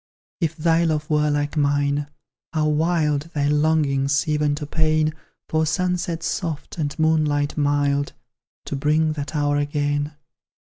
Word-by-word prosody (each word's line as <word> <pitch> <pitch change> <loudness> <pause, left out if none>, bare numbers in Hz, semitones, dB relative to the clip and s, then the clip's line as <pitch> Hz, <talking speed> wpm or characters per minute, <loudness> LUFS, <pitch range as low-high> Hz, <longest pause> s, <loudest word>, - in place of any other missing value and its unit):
If 165 -3 -1
thy 165 +1 +2
love 155 -2 0
were 150 0 +3
like 145 0 -1
mine, 145 0 +1 0.5
how 155 -1 +1
wild 155 -1 +1
Thy 145 -1 +1
longings, 145 -2 +2
even 150 -1 +1
to 150 0 -5
pain, 155 0 +1 0.3
For 160 0 +1
sunset 175 0 -1
soft, 165 -2 -3
and 145 -2 -2
moonlight 155 -2 +1
mild, 145 -1 +1 0.5
To - - -3
bring 155 +3 +2
that 150 +1 -5
hour 145 -1 +1
again! 145 0 -1
150 Hz, 135 wpm, -22 LUFS, 145-160 Hz, 0.5 s, were